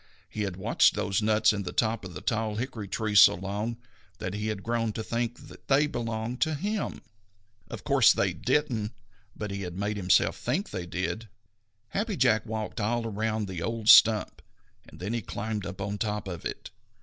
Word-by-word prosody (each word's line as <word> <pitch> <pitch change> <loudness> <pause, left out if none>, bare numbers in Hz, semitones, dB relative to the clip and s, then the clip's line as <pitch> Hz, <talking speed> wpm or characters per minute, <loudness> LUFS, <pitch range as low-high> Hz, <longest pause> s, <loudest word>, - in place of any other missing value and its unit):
He 110 - -5
had 95 -3 -2
watched 105 +5 +3
those 100 0 0
nuts 110 0 +3
in 100 - -2
the 90 -2 -5
top 110 +4 0
of 90 -3 -8
the 75 - -6
tall 110 -2 -1
hickory 115 -3 -4
tree 110 +1 -2
so 100 - +8
long 100 +5 -3 0.4
that 90 - -4
he 105 +1 -3
had 105 -2 -3
grown 115 -1 0
to 110 - -4
think 120 +4 -3
that - - -15
they 140 +2 +4
belonged 115 -2 -4
to 160 -1 +2
him. 205 +7 -3 0.7
Of - - -7
course - - +5
they - - +1
didn't, 120 -8 0 0.4
but 105 -2 -5
he 100 0 -4
had 90 -2 -6
made 105 +1 -2
himself 90 -2 +3
think 155 - -2
they 90 -4 -4
did. 95 +6 -3 0.6
Happy 205 - -2
Jack 110 +1 +3
walked 110 0 -4
all 115 +2 0
around 110 0 -2
the 90 -3 -5
old 115 +3 -1
stump, 110 -1 +7 0.5
and - - -15
then 100 +6 -3
he 120 - -1
climbed 105 -1 -4
up 100 - -8
on 100 +1 -3
top 105 -1 -2
of 85 -3 -6
it. - - -5
110 Hz, 195 wpm, -28 LUFS, 100-115 Hz, 0.7 s, so